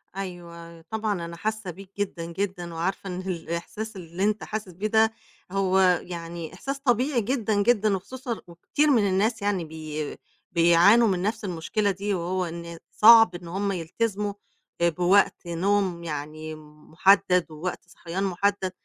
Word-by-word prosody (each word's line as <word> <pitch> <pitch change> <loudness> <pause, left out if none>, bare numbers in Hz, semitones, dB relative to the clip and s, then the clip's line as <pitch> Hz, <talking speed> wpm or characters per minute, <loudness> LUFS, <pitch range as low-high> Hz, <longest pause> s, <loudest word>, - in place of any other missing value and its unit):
أيوه 170 -3 -8
طبعًا 210 -2 -3
أنا 170 0 -7
حاسّة 215 -3 -3
بيك 190 +2 -12
جدًا، 190 -4 -3
جدًا، 175 -1 -4
وعارفة 180 +4 -2
إن 180 0 -4
الإحساس 185 +4 -5
اللي 175 0 -5
أنت 210 +1 +1
حاسس 215 -2 -5
بيه 195 +5 -3
ده 220 +1 +3 0.4
هو 190 -1 +2 0.2
يعني 170 -1 -7
إحساس 275 +9 -5
طبيعي 255 -1 +2
جدًا، 215 -3 0
جدًا، 215 -3 +3
وخصوصًا 240 +4 -6
وكتير 180 - 0
من 220 -6 +4
الناس 210 +4 +1
يعني 200 -4 0
بي 155 -1 -6 0.3
بيعانوا 175 +7 +6
من 185 -3 0
نفس 215 +2 -2
المشكلة 195 +4 -1
دي 200 +2 -2
وهو 180 +1 -1
إن 170 0 -7
صعب 225 -4 +7
إن 175 -1 -8
هُم 195 +3 -1
يلتزموا، 200 +4 -2 0.5
آآ، 170 - +5
بوقت 180 +4 +3
نوم، 185 0 0
يعني، 155 0 -5
محدد 165 +5 +2
ووقت 175 +4 -5
صحيان 175 +2 -5
محدد. 195 0 0
185 Hz, 145 wpm, -26 LUFS, 170-210 Hz, 0.5 s, صعب